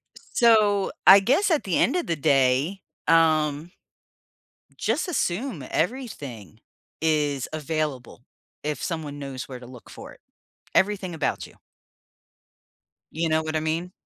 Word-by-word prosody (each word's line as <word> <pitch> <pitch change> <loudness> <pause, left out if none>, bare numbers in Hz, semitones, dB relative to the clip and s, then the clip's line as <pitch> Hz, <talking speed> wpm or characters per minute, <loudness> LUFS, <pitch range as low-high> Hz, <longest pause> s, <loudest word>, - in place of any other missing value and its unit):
So, 215 -4 +3
I 195 - +10
guess 280 - +2
at 305 - +2
the 185 -4 0
end 270 - +2
of 355 - -1
the 165 - 0
day, 140 +6 +2 0.3
um, 155 -1 +2 1.1
just, 230 - -1
assume 200 - -2
everything 150 - -4 0.4
is 150 -4 0
available 150 -6 -4 0.4
if 150 -2 -3
someone 155 -4 -4
knows 135 -2 -6
where 130 - -7
to 125 - -11
look 125 -1 -13
for - - -11
it, - - -20 0.5
everything 190 -3 +1
about 160 -3 -2
you. - - -19 1.6
You 165 +1 -1
know 160 0 +2
what 160 0 -4
I 155 - +2
mean? 160 +3 -2
160 Hz, 130 wpm, -25 LUFS, 145-195 Hz, 1.6 s, I